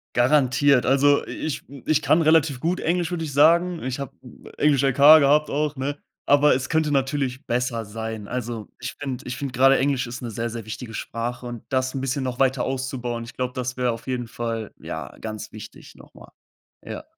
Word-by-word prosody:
Garantiert. 135 +1 +3
Also, 140 +2 +4
i - - -8
ich, 155 -3 -4
hm 140 -2 -12
ich 155 -1 +2
kann 160 +2 +3
relativ 155 -4 +3
gut 175 +6 -1
Englisch, 175 0 0
würde 170 -2 -2
ich 155 - -4
sagen. 170 +4 +4
Ich 130 +1 -3
habe 140 -2 -5
n - - -15
Englisch 145 -3 +3
LK 135 -2 +1 0.2
gehabt 150 +1 +3
auch, 150 +1 -1
ne? 140 +2 -3 0.3
Aber 145 +1 +5
es 130 0 -2
könnte 160 -2 +1
natürlich 135 -1 -1
besser 120 -2 -1
sein. 110 0 -6
Also, 120 -3 -4
ich - - -5
finde 135 -3 -5
ich 125 - -5
finde 140 -3 -5
grade 135 +1 +5
Englisch 135 -2 0
ist 125 +3 -7
'ne 120 - -5
sehr, 115 +2 -3
sehr 115 -1 -7
wichtige 115 +1 -7
Sprache 120 +3 -4
und 120 -2 -7
das 130 0 0
'n 135 - -2
bisschen 135 +1 -2
noch 125 -1 -4
weiter 130 -1 +2
auszubauen, 130 -3 -3
ich 120 - -10
glaube, 125 -1 -3
das 125 -1 -3
wär 125 -1 +1
auf 115 0 -9
jeden 125 -2 -2
Fall, 115 -2 -4
ja, - - -7
ganz 110 -1 -6
wichtig 110 -2 -11
noch - - -17
mal. - - -15 0.5
Ja. - - -7
130 Hz, 210 wpm, -23 LUFS, 120-145 Hz, 0.5 s, Aber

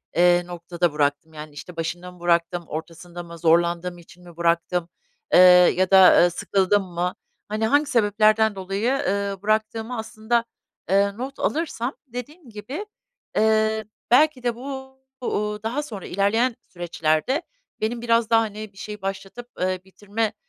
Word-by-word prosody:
eee, 175 0 +5
noktada 175 -1 -2
bıraktım? 145 +2 -1
Yani, 150 -1 -9
işte, 145 +6 -10
başında 175 +2 -4
mı 180 - -17
bıraktım, 170 0 +1
ortasında 170 +2 -7
mı, 170 0 -11
zorlandığım 170 +2 +2
için 175 +1 -17
mi 170 -1 -15
bıraktım, 170 0 0 0.4
eee, - - +8 0.4
ya 185 +1 +1
da, 190 -1 +8
ııı, 175 0 +5
sıkıldım 195 +3 +1
mı?" 180 +1 -1 0.3
Hani, 215 +1 -1
hangi 290 +4 +3
sebeplerden 215 -2 +3
dolayı, 195 +6 -1 0.2
ııı, 200 -1 -1
bıraktığımı 220 +3 -1
aslında, 220 +1 -1 0.5
ııı, 200 +1 +2
not 265 +3 -6
alırsam 290 -5 -1
dediğim 260 +4 -9
gibi, 255 - -6 0.5
eee, 220 0 +2 0.3
belki 270 -1 +4
de 240 -1 0
bu 265 +1 -7 0.3
bu, 210 -3 -1
ııı, 210 0 -8
daha 245 +7 -2
sonra 210 -10 -8
ilerleyen 225 +6 +1
süreçlerde 175 - -1 0.4
benim 230 +2 -1
biraz 230 -1 +2
daha, 225 0 +5
hani, 215 -1 -6
bir - - -22
şeyi 210 +1 -7
başlatıp, 195 +5 -6
ııı, 185 0 0
bitirme, 205 +3 -3
200 Hz, 150 wpm, -23 LUFS, 175-230 Hz, 0.5 s, eee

